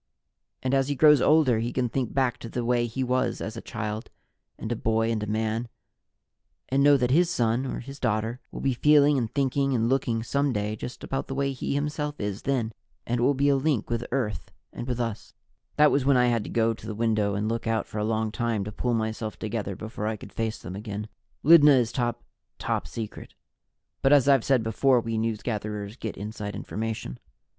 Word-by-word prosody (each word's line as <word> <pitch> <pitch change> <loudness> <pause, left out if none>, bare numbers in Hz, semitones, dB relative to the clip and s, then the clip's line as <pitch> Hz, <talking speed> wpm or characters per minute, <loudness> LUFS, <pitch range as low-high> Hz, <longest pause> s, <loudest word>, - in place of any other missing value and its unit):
"And 130 +1 0
as 135 -1 +3
he 145 - -1
grows 150 -1 +6
older, 150 -7 +4
he 120 +2 -2
can 125 -1 0
think 125 0 -2
back 130 -3 0
to 115 - -8
the 120 +1 -3
way 120 0 +2
he 130 +3 -3
was 130 -1 0
as 110 - -5
a 115 - -6
child 105 +2 -5 0.5
and 110 - -5
a - - +1
boy 115 0 +1
and 110 -2 -1
a 105 - -3
man, 110 +2 -1 1.0
and 135 +1 +2
know 145 0 +7
that 125 -1 0
his 170 +5 +4
son, 120 -1 0
or - - -4
his 135 +3 -10
daughter, 115 +1 -1
will - - -7
be 135 - +1
feeling 145 +3 +5
and 120 -5 -1
thinking 135 0 +1
and 115 0 +1
looking 120 -4 0
some 140 +4 0
day 105 0 -2
just 125 +3 -8
about 135 - -3
the 135 - -4
way 140 0 0
he 135 +1 -3
himself 150 0 -2
is 105 -1 -3
then, 125 -5 -1 0.3
and 120 +1 -1
it - - 0
will 135 +3 +3
be 140 +2 +2
a 140 - +4
link 135 -5 0
with 120 0 -1
Earth 120 -5 -2 0.2
and 120 - -6
with 125 -1 -2
us 115 -3 -4 0.2
" - - -47
That 150 0 +6
was 140 - +2
when 135 -1 +4
I 125 0 +4
had 115 -3 +1
to - - -6
go 115 0 +2
to - - -11
the 110 - -4
window 110 -3 +1
and 105 +1 -1
look 115 +1 -2
out 115 -2 0
for 105 - -6
a - - 0
long 110 0 0
time 115 -2 -1
to 105 - -5
pull 120 +3 -1
myself 110 -1 -3
together 105 -3 -3
before 110 0 -5
I 110 0 -2
could - - -12
face 110 -1 -2
them 90 +2 -8
again. 105 +1 -6 0.3
Lydna 150 -1 +8
is 120 -1 +1
top 120 -1 -2 0.3
top - - -2
secret, 110 +7 -7 0.7
but 135 - +3
as 145 -2 +5
I've 135 -4 +5
said 130 -4 +3
before, 125 +3 +3
we 115 -1 -2
newsgatherers 105 -1 -3
get 110 - -5
inside 105 0 -5
information. 110 - -4
115 Hz, 220 wpm, -26 LUFS, 110-135 Hz, 1.0 s, Lydna